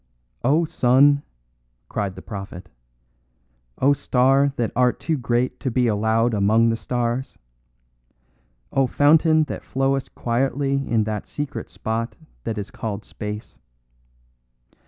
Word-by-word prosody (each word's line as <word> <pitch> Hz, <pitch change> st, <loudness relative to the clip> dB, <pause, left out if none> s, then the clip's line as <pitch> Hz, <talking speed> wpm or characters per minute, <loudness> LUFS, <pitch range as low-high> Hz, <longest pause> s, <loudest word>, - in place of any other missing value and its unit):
"O 155 Hz, +5 st, +3 dB
sun," 140 Hz, +1 st, +4 dB, 0.7 s
cried 100 Hz, +4 st, -3 dB
the -, -, -10 dB
prophet, 95 Hz, -3 st, -8 dB, 1.1 s
"O 140 Hz, +2 st, +4 dB
star 135 Hz, 0 st, +3 dB
that 120 Hz, -4 st, -1 dB
art 125 Hz, 0 st, +2 dB
too 160 Hz, -, -1 dB
great 125 Hz, 0 st, -1 dB
to 135 Hz, -, -2 dB
be 125 Hz, +1 st, +1 dB
allowed 110 Hz, +2 st, +2 dB
among 110 Hz, +3 st, +3 dB
the 115 Hz, -, +1 dB
stars! 120 Hz, +2 st, -2 dB, 1.4 s
O 135 Hz, -1 st, +3 dB
fountain 155 Hz, +4 st, +4 dB
that 150 Hz, -, -6 dB
flowest 135 Hz, 0 st, -1 dB
quietly 135 Hz, +3 st, 0 dB, 0.2 s
in 115 Hz, -2 st, +2 dB
that 105 Hz, -1 st, -4 dB
secret 135 Hz, -6 st, -5 dB
spot 115 Hz, +1 st, -3 dB, 0.3 s
that 115 Hz, -, -2 dB
is 105 Hz, 0 st, -5 dB
called 105 Hz, -1 st, -5 dB
space. 105 Hz, 0 st, -7 dB
120 Hz, 120 wpm, -23 LUFS, 110-135 Hz, 1.4 s, sun